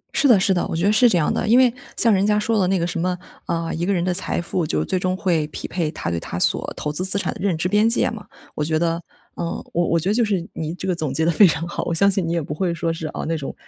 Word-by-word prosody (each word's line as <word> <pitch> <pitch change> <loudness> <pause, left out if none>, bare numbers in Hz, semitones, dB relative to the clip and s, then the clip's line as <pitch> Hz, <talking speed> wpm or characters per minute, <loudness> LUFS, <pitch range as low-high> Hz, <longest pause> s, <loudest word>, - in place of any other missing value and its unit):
是 285 - +4
的 235 -7 +6
是 190 +1 +3
的， 175 - 0
我 - - -4
觉 170 +4 0
得 205 - +4
是 240 +2 +5
这 180 - +2
样 155 - +1
的。 - - -2
因 235 +3 +5
为 250 -2 +5 0.2
像 230 -2 +5
人 195 0 +2
家 210 0 +2
说 220 +1 0
的 185 - +2
那 190 - +1
个 170 - -1
什 175 -1 -3
么 180 +1 -1 0.3
呃， 165 -1 -2
一 170 - -3
个 200 - 0
人 175 -3 0
的 180 0 0
财 180 - 0
富 175 0 -2
就 155 - -1
最 185 - 0
终 185 0 -1
会 170 -6 0
匹 - - -6
配 170 -3 -2
他 120 - -4
对 85 - -2
他 85 - -6
所 - - +2
投 150 - -3
资 165 +5 -1
资 190 +1 +2
产 - - -2
的 - - -12
认 180 -5 +1
知 170 - -1
边 210 +3 +3
界 230 - +3
嘛。 215 -2 -9 0.3
我 150 - -1
觉 155 +1 0
得 165 +1 -1 0.3
嗯， - - -4 0.3
我 175 0 +1
我 170 - +2
觉 185 - -1
得 - - +2
就 235 +1 +2
是 195 -5 -1
你 160 +1 -4
这 190 - -6
个 180 - 0
总 155 -5 -3
结 160 +4 0
得 170 - +3
非 195 +4 +6
常 165 +1 -1
好， - - -4
我 170 - -2
相 200 +4 +4
信 190 -2 0
你 165 - -2
也 170 - 0
不 150 - -5
会 175 +3 -1
说， 165 0 -2
是 160 -1 -5
啊， - - -5
那 165 - -1
种 145 -3 -5
175 Hz, 350 characters per minute, -21 LUFS, 165-195 Hz, 0.3 s, 的